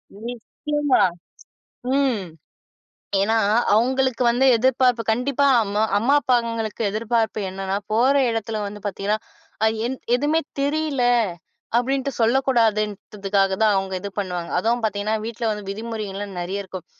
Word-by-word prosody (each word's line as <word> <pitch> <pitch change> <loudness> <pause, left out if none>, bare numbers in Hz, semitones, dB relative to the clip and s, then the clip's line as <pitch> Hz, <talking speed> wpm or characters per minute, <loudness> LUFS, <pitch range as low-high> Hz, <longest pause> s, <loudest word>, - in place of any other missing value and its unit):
நிச்சயமா, 255 +5 -1 0.9
ம், 265 -7 +1 1.0
ஏன்னா, 220 +3 +2 0.4
அவுங்களுக்கு 260 +2 +2
வந்து 255 +3 +2
எதிர்பார்ப்பு 250 -1 +2
கண்டிப்பா 275 +4 +1 0.2
அம்மா 205 +1 -1 0.2
அம்மா, 245 +7 +2
அப்பாங்களுக்கு 230 -3 -1
எதிர்பார்ப்பு 220 0 -1
என்னன்னா, 195 +1 -3 0.2
போற 250 +5 +4 0.2
இடத்துல 225 -1 -3
வந்து 205 +1 -8
பார்த்தீங்கன்னா, 205 +2 -1 0.5
அ - - +5 0.2
என் 260 +1 -4 0.2
எதுமே 300 +5 +1 0.2
தெரியல, 285 -2 0 0.7
அப்பிடின்ட்டு 270 +2 0
சொல்லக் 250 +4 +2
கூடாதுன்றக்காகதான் 210 -3 +1
அவுங்க 190 0 -2
இது 200 - -5
பண்ணுவாங்க. 180 -3 -3
அதுவும் 230 +5 0
பாத்தீங்கன்னா, 215 +1 0
வீட்ல 230 0 -2
வந்து 205 -2 -7
விதிமுறைகள் 205 -3 -5
நிறைய 195 +3 -3
இருக்கும். 185 -2 -9
225 Hz, 115 wpm, -22 LUFS, 205-255 Hz, 1.0 s, அ